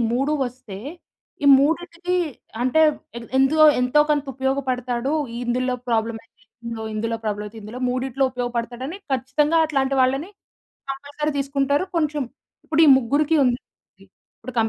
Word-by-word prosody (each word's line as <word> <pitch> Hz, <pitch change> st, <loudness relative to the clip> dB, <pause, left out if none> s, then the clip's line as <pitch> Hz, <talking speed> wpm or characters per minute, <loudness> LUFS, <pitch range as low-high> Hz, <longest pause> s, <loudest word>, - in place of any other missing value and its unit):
3 270 Hz, +5 st, +1 dB
వస్తే 245 Hz, -6 st, -9 dB, 0.7 s
ఈ -, -, +3 dB
మూడిటికి 340 Hz, +4 st, 0 dB, 0.5 s
అంటే 255 Hz, +5 st, +3 dB, 0.6 s
ఎంతో 310 Hz, +4 st, +5 dB, 0.2 s
ఎంతో 250 Hz, +4 st, +3 dB
కొంత 290 Hz, -2 st, +2 dB
ఉపయోగపడతాడు. 260 Hz, -1 st, -1 dB, 0.3 s
ఇందులో 250 Hz, +1 st, 0 dB
ప్రాబ్లమ్ 225 Hz, 0 st, 0 dB, 0.8 s
ఇందులో 230 Hz, +1 st, -2 dB
ప్రాబ్లమ్ 210 Hz, -1 st, -2 dB
అయితే 215 Hz, +2 st, -10 dB
ఇందులో 215 Hz, +4 st, -8 dB
మూడిట్లో 260 Hz, +1 st, -1 dB
ఉపయోగపడతాడు 245 Hz, -1 st, -4 dB
అని 340 Hz, -, -6 dB, 0.2 s
ఖచ్చితంగా 280 Hz, +5 st, +1 dB
అట్లాంటి 275 Hz, -3 st, 0 dB
వాళ్ళని 270 Hz, +7 st, +1 dB, 0.6 s
కంపల్సరీ 285 Hz, +2 st, -3 dB
తీసుకుంటారు. 280 Hz, +3 st, +1 dB
కొంచెం 300 Hz, -2 st, 0 dB, 0.4 s
ఇప్పుడు 320 Hz, +1 st, +3 dB
ఈ -, -, +6 dB
ముగ్గురికి 285 Hz, +6 st, +1 dB
ఉంది 245 Hz, -1 st, +1 dB, 0.4 s
ఇప్పుడు 225 Hz, +5 st, -14 dB
కం 225 Hz, -1 st, +3 dB
265 Hz, 125 wpm, -22 LUFS, 245-290 Hz, 0.8 s, ఈ